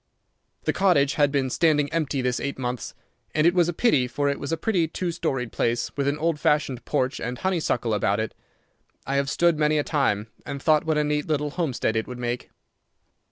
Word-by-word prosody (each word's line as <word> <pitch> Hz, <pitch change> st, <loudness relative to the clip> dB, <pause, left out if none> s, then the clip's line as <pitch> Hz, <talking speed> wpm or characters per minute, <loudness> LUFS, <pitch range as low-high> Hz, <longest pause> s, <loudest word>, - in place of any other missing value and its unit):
The -, -, +1 dB
cottage 160 Hz, -8 st, +3 dB
had 145 Hz, -2 st, +3 dB
been 135 Hz, -2 st, 0 dB
standing 150 Hz, -2 st, +2 dB
empty 145 Hz, -5 st, 0 dB
this 125 Hz, -1 st, 0 dB
eight 140 Hz, -, -3 dB
months, 125 Hz, -2 st, -4 dB, 0.4 s
and 155 Hz, +1 st, +3 dB
it 170 Hz, -, +5 dB
was 175 Hz, -2 st, +3 dB
a -, -, +1 dB
pity, 160 Hz, -, +2 dB
for 140 Hz, +3 st, 0 dB
it 140 Hz, -, -2 dB
was 140 Hz, -, -4 dB
a 165 Hz, -, 0 dB
pretty 180 Hz, -6 st, +1 dB
two 175 Hz, +2 st, -3 dB
storied 135 Hz, -8 st, -2 dB
place, 120 Hz, 0 st, 0 dB
with 140 Hz, -1 st, -1 dB
an 140 Hz, +1 st, +1 dB
old 160 Hz, 0 st, 0 dB
fashioned 150 Hz, -5 st, +1 dB
porch 130 Hz, +1 st, 0 dB
and 125 Hz, +1 st, -4 dB
honeysuckle 160 Hz, -, 0 dB
about 100 Hz, 0 st, +1 dB
it. 110 Hz, -, -2 dB, 0.7 s
I 140 Hz, +1 st, 0 dB
have 140 Hz, 0 st, +1 dB
stood 170 Hz, 0 st, +2 dB
many 150 Hz, 0 st, +3 dB
a 150 Hz, -, +2 dB
time 135 Hz, -10 st, 0 dB, 0.2 s
and 140 Hz, -, -5 dB
thought 155 Hz, +1 st, +3 dB
what 160 Hz, -1 st, +1 dB
a 150 Hz, -, +3 dB
neat 150 Hz, 0 st, -1 dB
little 150 Hz, -1 st, 0 dB
homestead 130 Hz, -9 st, -1 dB
it 110 Hz, -, -1 dB
would 125 Hz, -, -7 dB
make. 120 Hz, 0 st, -3 dB
145 Hz, 210 wpm, -25 LUFS, 125-160 Hz, 0.7 s, it